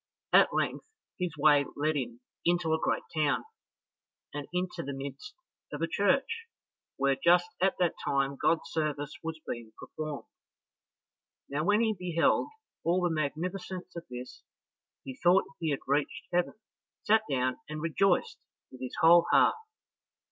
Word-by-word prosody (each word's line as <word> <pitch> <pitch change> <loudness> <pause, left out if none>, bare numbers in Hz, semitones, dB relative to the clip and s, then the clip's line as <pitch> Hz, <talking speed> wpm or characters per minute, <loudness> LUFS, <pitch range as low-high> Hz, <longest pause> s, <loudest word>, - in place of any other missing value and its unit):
At - - +7
length - - -1 0.3
his 180 -4 -2
way 145 -1 +5
led 155 +2 0
him 120 -3 -4 0.2
into 175 -2 +2
a 160 - +1
great - - 0
town, 150 -2 +2 0.9
and 145 -1 -5
into 180 0 -2
the 140 0 -5
midst 140 - -7 0.4
of 150 +2 -4
a - - +2
church, 275 - +1 0.5
where 135 0 +2
just 175 +1 +5
at 190 +1 +3
that 175 -2 +2
time 140 0 +1
God's 165 +4 +1
service 150 -2 -2
was 160 -1 -5
being 115 -2 -6
performed. 155 -2 -6 1.2
Now 145 +2 -1
when 210 +4 +4
he 220 -1 +2
beheld 175 -3 +1 0.4
all 180 +2 +2
the 175 -2 +1
magnificence 180 +5 -3
of 170 - -7
this, 125 0 -8 0.6
he 130 -1 -7
thought 180 +2 +5 0.2
he 165 -2 -1
had 140 - -1
reached 145 +2 0
heaven, 175 0 +1 0.5
sat 220 +1 +4
down, 130 -2 0
and 155 0 -4
rejoiced 170 +4 +1 0.3
with 130 - -12
his 130 - -5
whole 170 +1 +7
heart. - - +5
160 Hz, 150 wpm, -30 LUFS, 140-180 Hz, 1.2 s, At